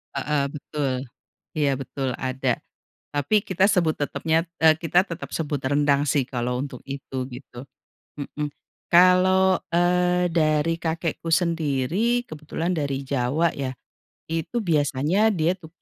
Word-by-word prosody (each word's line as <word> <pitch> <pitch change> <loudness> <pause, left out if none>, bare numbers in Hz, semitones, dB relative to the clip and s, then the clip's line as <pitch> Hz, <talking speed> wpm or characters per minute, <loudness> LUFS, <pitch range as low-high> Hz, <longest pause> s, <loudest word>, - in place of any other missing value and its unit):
Heeh, 145 +1 0
betul, 145 -1 -3 0.7
iya 145 -2 +2
betul 135 0 -3 0.2
ada, 130 -1 -1 0.6
tapi 145 +8 0
kita 185 0 -1
tetap - - +3
sebut 165 -3 +2
tetepnya 160 +2 0 0.5
kita 170 +1 +2
tetep 170 -1 -7
sebut 150 -3 -2
rendang 140 +1 +2
sih 140 -3 +2
kalau 125 -1 -2
untuk 135 -3 -7
itu 140 -1 -7 0.2
gitu, 125 -1 -10 0.6
mhm, 150 +1 -4 0.4
kalau 185 +1 +5 0.7
dari, 155 -1 +2
eee, - - -44
kakekku 165 0 -2
sendiri 170 - +1
kebetulan 160 -2 -4
dari 140 -5 -2
Jawa 140 +5 +1
ya, 130 -2 -4 0.6
itu 165 +8 -3
biasanya 155 +5 +2
dia 165 0 +2
tu 160 - -11
150 Hz, 125 wpm, -24 LUFS, 140-170 Hz, 0.7 s, kalau